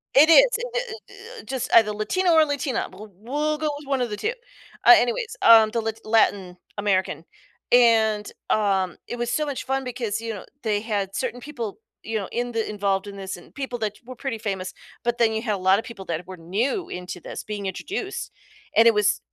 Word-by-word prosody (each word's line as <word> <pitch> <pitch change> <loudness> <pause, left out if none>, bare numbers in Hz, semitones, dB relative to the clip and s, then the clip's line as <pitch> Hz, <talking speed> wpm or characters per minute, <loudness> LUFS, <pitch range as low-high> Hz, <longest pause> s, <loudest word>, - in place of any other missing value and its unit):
It 300 +4 +7
is, - - +8 0.3
i - - +1 0.6
i - - -8
i - - -19
just 255 +2 -4
either 220 -2 +6
Latino 345 - 0
or 320 -1 +6
Latina. 285 -3 -2
We 185 - -14
we'll 290 +10 -2
go 310 0 -1
with 290 -1 -12
1 270 -2 0
of 245 - -1
the 210 - -4
2. 440 - -1 0.5
Uh, - - +11
anyways, 245 - -1
um, 225 -1 +8
the 230 0 -1
Lat 225 0 -4
Latin 200 -5 +2 0.2
American. 190 -4 0 0.5
And, 220 -3 +4 0.2
um, 195 -4 +1
it 240 - -5
was 240 0 -2
so 300 +5 0
much 285 -3 -4
fun 270 0 -1
because, 240 -4 -3
you 230 -1 -4
know, 200 - -8 0.2
they 210 -2 +1
had 205 -3 -2
certain 245 +1 -3
people, 240 -7 -6 0.2
you 225 0 -3
know, 200 -3 -4
in 240 0 -2
the 225 -1 -1
involved 200 -1 -1
in 200 0 -8
this 190 -1 -5
and 175 - -16
people 265 -4 -4
that 210 -2 -2
were 255 +1 -9
pretty 250 -1 -4
famous, 195 -4 -4 0.3
but 240 0 0
then 230 -2 +3
you 220 - -1
had 220 -3 -1
a - - -4
lot 190 +1 +4
of 220 - -3
people 220 -6 -9
that 170 0 -4
were 185 0 -9
new 225 - -1
into 180 0 -6
this - - -7
being 205 -2 -5
introduced. 390 - -4 0.5
And 230 - +7
it 230 - +7
was 210 -1 +2
225 Hz, 215 wpm, -24 LUFS, 200-255 Hz, 0.6 s, Uh